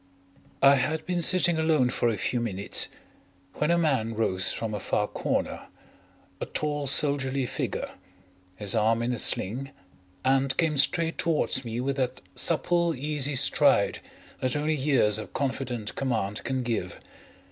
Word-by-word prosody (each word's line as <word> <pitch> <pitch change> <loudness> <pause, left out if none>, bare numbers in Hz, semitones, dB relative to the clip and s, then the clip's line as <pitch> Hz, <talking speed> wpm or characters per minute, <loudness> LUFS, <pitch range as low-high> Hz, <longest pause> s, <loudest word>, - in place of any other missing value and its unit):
I 140 0 +7
had 155 +4 -2
been 180 -1 -1
sitting 175 -1 +3
alone 155 -6 +2
for 120 - 0
a 110 - -2
few 120 +6 -1
minutes 100 -4 +2 0.7
when 150 - -1
a 170 - +3
man 130 -9 0
rose 95 -4 0
from 110 -2 -3
a 105 - -3
far - - -1
corner, - - -3 0.7
a - - -4
tall 145 -1 -3
soldierly 135 -1 0
figure, - - -3 0.7
his 100 -1 +1
arm 115 +1 +1
in 125 +1 -1
a 120 - -2
sling, 125 +8 +3 0.6
and 135 0 +1
came 155 -4 +1
straight 165 +2 +2
towards 155 -5 +1
me 115 0 -5
with 135 +1 -2
that 130 -1 -2
supple, 170 - +2
easy 145 +1 0
stride - - +3 0.4
that 130 +1 -1
only 150 +2 0
years 130 -7 +2
of - - -9
confident 130 -5 -3
command 110 -6 -2
can 130 -1 -2
give. 110 -7 -3
130 Hz, 150 wpm, -26 LUFS, 115-150 Hz, 0.7 s, I